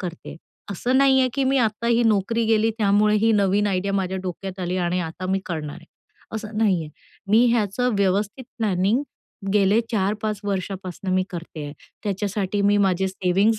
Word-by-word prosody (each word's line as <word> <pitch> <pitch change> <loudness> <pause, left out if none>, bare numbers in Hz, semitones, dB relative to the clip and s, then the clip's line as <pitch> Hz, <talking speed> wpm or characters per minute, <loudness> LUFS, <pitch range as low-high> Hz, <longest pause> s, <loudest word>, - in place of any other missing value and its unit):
करते 175 -3 -7
आहे, - - -8 0.4
असं 245 +7 0
नाही 270 -1 +5
आहे, 255 - +3
की 275 - +1
मी 270 +1 +2
आता 225 -1 0
ही 235 0 +3
नोकरी 225 +1 +2
गेली, 220 0 +3
त्यामुळे 210 +1 +3
ही 225 +2 +3
नवीन 205 0 +2
आयडिया 195 0 -1
माझ्या 190 -1 -1
डोक्यात 190 +1 -6
आली 180 +1 -2
आणि 180 0 0
आता 170 +2 -5
मी 195 0 +1
करणार 155 -4 -4
आहे, 170 -1 -15 0.5
असं 215 -1 -5
नाही 200 -6 +3
आहे. 150 - -10 0.4
मी 225 +3 +6
ह्याचं 235 +2 0
व्यवस्थित 200 +5 0
प्लॅनिंग 210 +3 +1 0.5
गेले 205 +1 +4
4-5 210 0 -1
वर्षापासून 190 -1 -4
मी 185 - +3
करते 170 -4 -7
आहे. 145 - -6 0.3
त्याच्यासाठी 200 0 -1
मी 205 +1 +4
माझे 190 0 +1
सेव्हिंग्ज 195 +4 +1
200 Hz, 175 wpm, -23 LUFS, 185-220 Hz, 0.5 s, मी